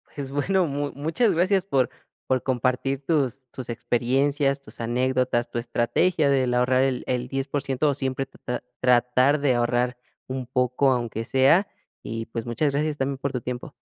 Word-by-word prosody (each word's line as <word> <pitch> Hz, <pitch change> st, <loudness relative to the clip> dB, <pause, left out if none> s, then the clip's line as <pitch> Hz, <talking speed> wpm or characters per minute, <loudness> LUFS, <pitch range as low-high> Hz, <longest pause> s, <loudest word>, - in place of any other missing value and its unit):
pues 140 Hz, -2 st, -5 dB
bueno 180 Hz, +7 st, +1 dB
mu 145 Hz, -1 st, -2 dB
muchas 160 Hz, -, +1 dB
gracias 185 Hz, +3 st, +2 dB
por 135 Hz, -10 st, +1 dB, 0.4 s
por 130 Hz, -1 st, +1 dB
compartir 130 Hz, +2 st, -1 dB
tus 135 Hz, -5 st, 0 dB
tus 130 Hz, -2 st, -8 dB
experiencias, 135 Hz, +4 st, +1 dB
tus 120 Hz, -4 st, -15 dB
anécdotas, 125 Hz, +1 st, 0 dB
tu 120 Hz, -, -2 dB
estrategia 140 Hz, +7 st, +1 dB
del 130 Hz, -3 st, +2 dB
ahorrar 125 Hz, +1 st, +3 dB
el 130 Hz, -2 st, 0 dB
el 125 Hz, -1 st, -1 dB
10 135 Hz, +1 st, -2 dB
por 140 Hz, 0 st, -1 dB
ciento 135 Hz, +3 st, 0 dB
o -, -, +2 dB
siempre 135 Hz, -1 st, -2 dB
tatrar 125 Hz, -2 st, -6 dB, 0.2 s
tratar 125 Hz, +3 st, +4 dB
de 140 Hz, -3 st, +3 dB
ahorrar 120 Hz, +1 st, +1 dB, 0.3 s
un 130 Hz, -1 st, -4 dB
poco 125 Hz, +1 st, +2 dB
aunque 120 Hz, -3 st, -2 dB
sea 135 Hz, -, +4 dB, 0.4 s
y, 115 Hz, 0 st, -4 dB
pues 115 Hz, 0 st, -5 dB
muchas 140 Hz, +5 st, 0 dB
gracias 150 Hz, +1 st, 0 dB
también 135 Hz, 0 st, -1 dB
por 140 Hz, +1 st, -3 dB
tu 125 Hz, -, -2 dB
tiempo. 125 Hz, +5 st, -6 dB
130 Hz, 175 wpm, -25 LUFS, 125-140 Hz, 0.4 s, tratar